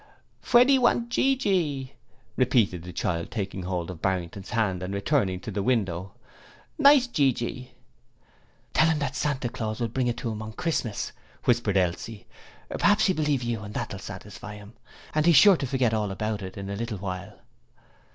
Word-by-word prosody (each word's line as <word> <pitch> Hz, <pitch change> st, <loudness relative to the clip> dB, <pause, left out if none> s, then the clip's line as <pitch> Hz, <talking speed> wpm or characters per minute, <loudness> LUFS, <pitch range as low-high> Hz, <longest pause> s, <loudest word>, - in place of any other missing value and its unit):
'Fweddie 255 Hz, +3 st, +5 dB
want 240 Hz, -1 st, +2 dB
gee 270 Hz, +2 st, +3 dB
gee,' 155 Hz, -, 0 dB, 0.4 s
repeated 115 Hz, -9 st, +2 dB
the 90 Hz, +2 st, -8 dB
child, 85 Hz, -1 st, -2 dB
taking 95 Hz, -3 st, -4 dB
hold 90 Hz, -1 st, -3 dB
of 85 Hz, -, -10 dB
Barrington's 95 Hz, 0 st, -2 dB
hand 105 Hz, -6 st, 0 dB
and 95 Hz, +2 st, -4 dB
returning 100 Hz, -4 st, +1 dB
to 110 Hz, -, -6 dB
the 100 Hz, 0 st, -2 dB
window. 95 Hz, -6 st, -1 dB, 0.6 s
'Nice 280 Hz, -2 st, +7 dB
gee 145 Hz, -, +2 dB
gee.' 125 Hz, +1 st, -5 dB, 1.0 s
'Tell 160 Hz, -, +4 dB
him 160 Hz, -, +2 dB
that 140 Hz, -2 st, -2 dB
Santa 135 Hz, -2 st, -1 dB
Claus'll 115 Hz, 0 st, -3 dB
bring 125 Hz, 0 st, 0 dB
it 120 Hz, -, -1 dB
to 120 Hz, -4 st, -3 dB
him 110 Hz, 0 st, -5 dB
on 110 Hz, 0 st, -7 dB
Christmas,' 120 Hz, -, -2 dB, 0.3 s
whispered 115 Hz, -5 st, +2 dB
Elsie. 95 Hz, +4 st, -2 dB, 0.5 s
'P'raps 205 Hz, +1 st, +4 dB
he'll 185 Hz, -, +2 dB
believe 150 Hz, -4 st, 0 dB
you 120 Hz, -2 st, -2 dB
and 105 Hz, 0 st, -9 dB
that'll 100 Hz, -, -4 dB
satisfy 105 Hz, +2 st, -9 dB
him, 105 Hz, +2 st, -12 dB, 0.4 s
and 155 Hz, +2 st, +2 dB
he's 170 Hz, -, +6 dB
sure 195 Hz, +7 st, +8 dB
to 140 Hz, -, -3 dB
forget 125 Hz, -3 st, +1 dB
all 105 Hz, -2 st, 0 dB
about 105 Hz, +2 st, -3 dB
it 95 Hz, 0 st, -7 dB
in 100 Hz, 0 st, -5 dB
a -, -, -3 dB
little 115 Hz, 0 st, -4 dB
while.' 95 Hz, -1 st, -6 dB
115 Hz, 175 wpm, -26 LUFS, 95-145 Hz, 1.0 s, sure